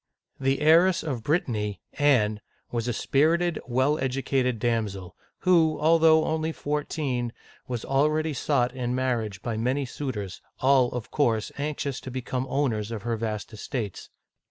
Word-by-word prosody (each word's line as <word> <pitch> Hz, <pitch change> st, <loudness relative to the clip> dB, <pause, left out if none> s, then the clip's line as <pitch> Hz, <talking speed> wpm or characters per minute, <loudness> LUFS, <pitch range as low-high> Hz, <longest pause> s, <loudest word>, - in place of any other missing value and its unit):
The 135 Hz, +1 st, +1 dB
heiress 170 Hz, +4 st, +5 dB
of 135 Hz, -7 st, -3 dB
Brit 155 Hz, +8 st, +1 dB
tany, 105 Hz, -5 st, -3 dB
Anne, 110 Hz, -8 st, +2 dB, 0.3 s
was 115 Hz, 0 st, -2 dB
a -, -, +1 dB
spir 150 Hz, +7 st, +2 dB
ited, 175 Hz, -2 st, -1 dB
well 130 Hz, +5 st, +2 dB
educated 130 Hz, -1 st, 0 dB
damsel, 105 Hz, -6 st, -2 dB, 0.3 s
who, 165 Hz, -4 st, +4 dB
although 160 Hz, 0 st, +5 dB
only 160 Hz, 0 st, -1 dB
fourteen, 145 Hz, -5 st, -2 dB, 0.4 s
was 120 Hz, -3 st, -4 dB
al 135 Hz, +3 st, +3 dB
ready 155 Hz, 0 st, -1 dB
sought 125 Hz, -2 st, +1 dB
in 125 Hz, -1 st, -2 dB
marriage 115 Hz, -7 st, -1 dB
by 115 Hz, -2 st, -2 dB
many 130 Hz, +5 st, 0 dB
suitors, 120 Hz, -8 st, -5 dB, 0.2 s
all, 130 Hz, -2 st, +4 dB
of 120 Hz, -3 st, -5 dB
course, 115 Hz, -7 st, +1 dB
anxious 145 Hz, -2 st, -2 dB
to -, -, -7 dB
be 130 Hz, 0 st, -4 dB
come 130 Hz, +1 st, -2 dB
owners 115 Hz, -7 st, 0 dB
of 110 Hz, -3 st, -5 dB
her 120 Hz, 0 st, -1 dB
vast 110 Hz, -1 st, -4 dB
estates. 110 Hz, -2 st, -5 dB
130 Hz, 155 wpm, -26 LUFS, 115-150 Hz, 0.4 s, heiress